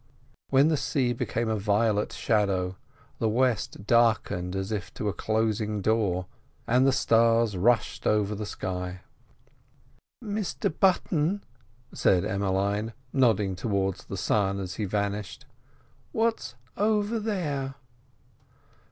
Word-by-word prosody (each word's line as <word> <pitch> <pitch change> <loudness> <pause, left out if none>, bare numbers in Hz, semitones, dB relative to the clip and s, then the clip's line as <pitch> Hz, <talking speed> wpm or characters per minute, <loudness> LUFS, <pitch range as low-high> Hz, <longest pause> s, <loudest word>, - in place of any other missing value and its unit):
Then 140 +3 +5
the 155 - +2
sea 130 -3 0
became 115 0 -2
a 110 -1 0
violet 105 +1 +1
shadow, 95 -4 0 0.4
the 110 - +1
west 120 -4 0
darkened 110 -6 +2
as 95 +2 -3
if 100 -4 -3
to 105 - -2
a - - -2
closing 110 -1 -1
door, 100 -3 +1 0.4
and 125 +3 +3
the - - +5
stars 115 -3 +3
rushed 115 +6 +1
over 105 -1 +2
the 105 0 -5
sky. 90 -2 -4 1.2
"Mr 205 -6 -2
Button," 185 0 +2 0.5
said 90 -2 +2
Emmeline, 100 +3 -1 0.2
nodding 105 -7 +2
towards 95 -1 -1
the - - -6
sun 100 -2 +1
as 95 -1 -5
he 105 - -1
vanished, 100 +1 -3 0.7
"where's 225 - 0 0.2
over 210 +2 +1
there?" 150 -11 -2
110 Hz, 115 wpm, -27 LUFS, 100-130 Hz, 1.2 s, Then